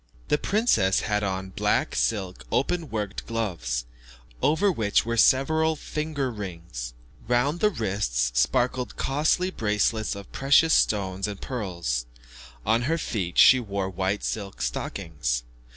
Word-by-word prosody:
The 150 - +3
princess 195 - +2
had 105 -1 0
on 95 -1 -3
black - - 0
silk 90 +10 -1
open 160 +4 0
worked 105 -3 -4
gloves, 85 - -2 0.6
over 190 +6 +3
which 110 - +1
were 115 0 -1
several 160 +7 +4
finger 150 -3 -3
rings. 85 - -7 0.3
Round 125 +7 +1
the 210 - +4
wrists 95 - -1
sparkled 125 - +1
costly 155 +6 +1
bracelets 110 - 0
of 100 -1 -10
precious 145 +4 +4
stones 95 -2 +1
and 100 -2 -6
pearls. 85 - -3 0.6
On 115 +1 +3
her 165 - +2
feet 95 - -3
she 130 - +8
wore 100 -4 -3
white 95 +2 -1
silk 100 - -4
stockings. - - -2
105 Hz, 130 wpm, -26 LUFS, 95-135 Hz, 0.6 s, she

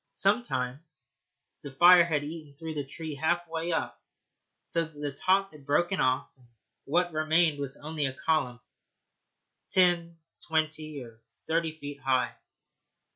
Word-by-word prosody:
Sometimes 155 - -1 0.5
the 145 - -7
fire 175 +6 +8
had 155 -4 0
eaten 150 -1 -8
through 160 0 -5
the 145 -2 -2
tree 160 +2 -6
halfway 165 +2 -1
up, 165 - -2 0.6
so 165 - 0
that 155 -2 -11
the 145 -1 -2
top 190 +7 +1
had 150 -2 -15
broken 175 +7 +1
off, 130 0 +2
and 125 -2 -23 0.4
what 175 +3 +1
remained 155 0 +2
was 140 -1 -4
only 150 -1 -2
a 130 - -4
column, 130 -4 0 1.1
ten, 175 -2 +3 0.3
twenty, 155 -2 -1
or 115 -1 -15 0.2
thirty 160 -1 -1
feet 145 -2 -7
high. 130 -1 +1
155 Hz, 135 wpm, -29 LUFS, 140-170 Hz, 1.1 s, fire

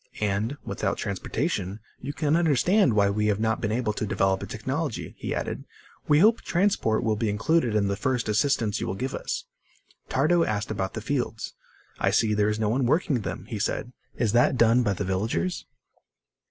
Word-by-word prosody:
"And, 105 +6 -1
without - - -2
transportation, 100 - -2 0.2
you 135 - -5
can 150 +1 +1
understand 165 - +3
why 100 -1 +4
we 105 +1 0
have 105 -1 +1
not 110 0 0
been 105 - -1
able 110 -1 0
to 110 - -3
develop 95 -2 +1
a - - -5
technology," 130 +5 -3
he - - -3
added. - - -3 0.4
"We 150 - +5
hope 220 +8 +5
transport 175 - +1
will 110 -2 +1
be 110 0 -1
included 115 +3 +1
in 100 -2 +2
the 100 - 0
first 125 +2 -1
assistance 110 -1 +1
you - - -2
will 95 - -2
give 130 +7 -3
us." - - -3 0.6
Tardo 160 +6 +3
asked 105 -3 -2
about 95 -3 -3
the 110 - -4
fields. 120 -2 -3 0.5
"I - - +2
see 110 -2 +2
there 105 0 +2
is 105 - -1
no 110 -2 +1
one 125 +2 +1
working 150 -3 +1
them," 85 0 -5
he 110 -2 -5
said. 120 +4 -2 0.2
"Is 115 -4 +1
that 120 +2 +3
done 115 +1 +5
by 105 -4 +1
the 100 - -3
villagers?" 110 - -1
110 Hz, 195 wpm, -26 LUFS, 105-140 Hz, 0.6 s, We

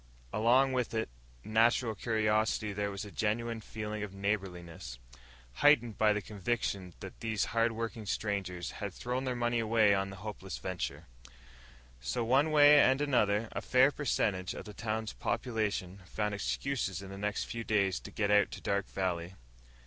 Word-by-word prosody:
Along 130 +5 +4
with 125 -3 -1
its 110 - -1 0.3
natural 115 +1 +3
curiosity 110 0 0
there 100 0 -1
was 100 0 -5
a 105 - -9
genuine 115 +2 -1
feeling 105 0 -5
of 100 -2 -6
neighborliness 90 - -3 0.6
heightened 120 -7 +4
by 110 -1 +5
the 105 -1 -1
conviction 100 -3 -3
that - - -9
these 110 -3 0
hardworking 115 -1 -1
strangers 95 -5 -2
had 100 -3 -6
thrown 125 +2 -3
their 130 -1 -1
money 120 -1 0
away 110 -2 +4
on 95 0 0
a - - -8
hopeless 95 -1 -6
venture. 95 -3 -4 0.9
So, 60 - -2
one 135 +7 +3
way 150 -1 +7
and 135 0 +5
another, 115 -7 +2
a - - -4
fair 130 +2 +4
percentage 105 -10 -1
of - - -7
the 105 - -9
town's 110 0 -3
population 110 -6 -2
found 105 +1 -2
excuses 100 -2 -2
in 95 - -9
the - - -7
next 105 0 -1
few 115 0 -5
days 100 -4 +1
to - - -10
get 105 -1 -1
out 105 0 +5
to - - -6
Dark 100 0 -1
Valley. 90 -1 -2
105 Hz, 165 wpm, -32 LUFS, 100-115 Hz, 0.9 s, way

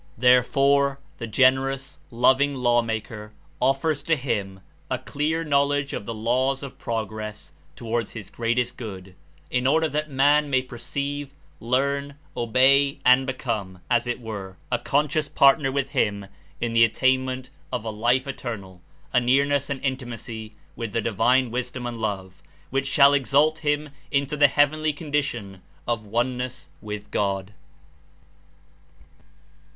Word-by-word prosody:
Therefore 135 +3 +4 0.2
the 115 - -4
generous, 135 +3 +2
loving 130 +4 +3
Law 120 -2 +3
maker 110 -1 -5 0.3
offers 135 +4 +1
to 165 - +1
him 105 -8 -3 0.3
a - - 0
clear 160 +3 -2
knowledge 145 -1 +1
of 100 - -5
the 115 - -3
laws 130 +5 0
of 135 - -9
progress 110 -8 -5 0.2
toward 115 -1 -2
his 105 -5 -9
great 115 +1 -1
est 125 0 -1
good, 95 -5 -8 0.4
In 125 +1 +1
order 160 +3 +3
that 150 0 -2
man 145 +2 +3
may 130 -2 +2
perceive, 140 +3 -5 0.2
learn, 140 +4 0 0.2
obey 135 +4 +3
and 130 +1 +5
become, 110 -8 -3
as 120 0 +2
it 120 +1 -2
were, 100 -5 -7
a 120 - +1
conscious 150 +1 0
partner 135 0 +4
with 135 0 -2
Him 105 -7 0 0.3
In 120 -1 -2
the 115 0 +6
attainment 130 +2 +1 0.2
of 125 -3 -3
a 110 - -2
Life 120 +4 +1
Eternal, 110 -9 -6 0.3
a - - +5
nearness 140 +3 +2
and 140 -1 -2
Intimacy 120 -4 -4 0.2
with 115 -3 -5
the 115 - +1
Divine 115 +4 +2
Wisdom 125 0 -3
and 120 -1 -5
Love, 95 -4 -4 0.3
which 135 +1 0
shall 140 +1 +6
exalt 145 +3 +3
him 150 -1 -1 0.2
Into 140 +1 0
the 145 -1 +6
heavenly 150 +2 +2
condition 140 - -3 0.3
of 115 -3 -2
"one 120 +4 0
ness 125 0 -5
with 105 -1 -7
God." 100 0 -1
130 Hz, 140 wpm, -24 LUFS, 115-140 Hz, 0.4 s, the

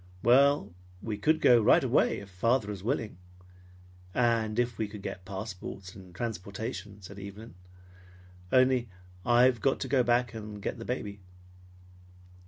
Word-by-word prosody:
"Well, 130 -4 +4 0.3
we 110 -2 -3
could 155 +8 +2
go 120 -2 +6
right - - +5
away - - +2
if 100 - -12
father 110 +3 +1
is 95 -2 -7
willing, 110 -6 -2 1.0
and 115 -3 +1
if 120 -1 0
we 110 - 0
could 105 -1 -10
get 90 - -6
passports 95 -1 -7
and 95 -3 -14
transportation," 105 -1 -5
said 100 +2 -10
Evelyn. 100 +3 -9 1.0
"Only 130 -2 +3 0.3
I've 120 0 +4
got 135 - +1
to - - -2
go 135 -2 +3
back 120 0 +1
and 105 -2 -7
get 100 - -4
the 115 - -7
baby." 105 -5 -4
110 Hz, 145 wpm, -29 LUFS, 100-120 Hz, 1.0 s, go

